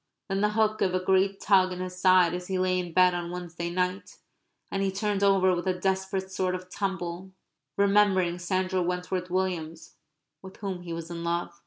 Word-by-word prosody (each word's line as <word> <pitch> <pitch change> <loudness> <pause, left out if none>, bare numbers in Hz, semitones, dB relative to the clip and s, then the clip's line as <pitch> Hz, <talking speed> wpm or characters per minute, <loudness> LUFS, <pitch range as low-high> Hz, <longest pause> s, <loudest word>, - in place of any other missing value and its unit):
Then 195 +1 0
the 210 - +3
hook 215 0 +1
gave 185 -1 +1
a - - +2
great 190 +1 +2
tug 190 -2 +4
in 180 - -5
his 185 0 -6
side 185 -2 +5
as 180 0 -5
he 190 - -1
lay 185 0 +1
in 175 -1 -4
bed 180 +1 +5
on 175 -1 -3
Wednesday 175 -1 -5
night; 180 +2 -2 0.5
and 195 - -1
he 195 -1 +1
turned 200 0 -1
over 190 -2 +4
with 175 +2 -4
a 180 -1 0
desperate 190 0 -1
sort 185 -1 -1
of 185 0 -9
tumble, 190 -1 -4 0.4
remembering 195 -3 +3
Sandra 185 +1 0
Wentworth 180 +1 -2
Williams 175 -3 -3 0.4
with 190 0 -12
whom 190 -3 -5
he 175 -1 -8
was 165 0 -6
in 170 0 -5
love. 170 0 -2
185 Hz, 195 wpm, -27 LUFS, 180-190 Hz, 0.5 s, side